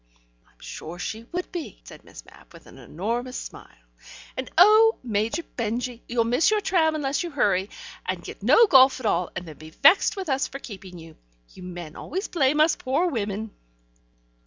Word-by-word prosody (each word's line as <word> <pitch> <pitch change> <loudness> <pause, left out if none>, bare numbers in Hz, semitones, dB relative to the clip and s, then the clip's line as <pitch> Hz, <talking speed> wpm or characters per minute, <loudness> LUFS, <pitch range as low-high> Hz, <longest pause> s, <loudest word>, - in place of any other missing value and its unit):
"I'm - - -32
sure 165 +3 -8
she 220 +5 -6
would 360 +8 -5
be," 345 -4 -7
said - - -13
Miss - - -13
Mapp, - - -19
with - - -15
an - - -15
enormous 235 +8 -4
smile. - - -11 0.5
"And, 260 - -5
oh, 430 +5 +6
Major 230 +7 -1
Benjy, 240 0 -4
you'll 235 -1 +1
miss 245 +7 +2
your 430 0 +2
tram 330 -6 +1
unless 280 -2 -1
you 350 - -4
hurry, 200 - 0 0.4
and - - -3
get - - -10
no 465 - +6
golf 265 -7 +6
at 250 - -8
all, 180 -4 +1
and 175 0 -6
then 155 - -11
be 155 0 -11
vexed 360 - +4
with 385 -2 -5
us 270 -1 0
for 275 - -8
keeping 195 -8 -10
you. 165 -1 -13 0.4
You - - -13
men 175 -3 -8
always 380 +4 -5
blame 295 -2 +1
us 310 +1 +4
poor 285 +8 0
women." 215 -3 -3
250 Hz, 185 wpm, -24 LUFS, 200-315 Hz, 0.5 s, oh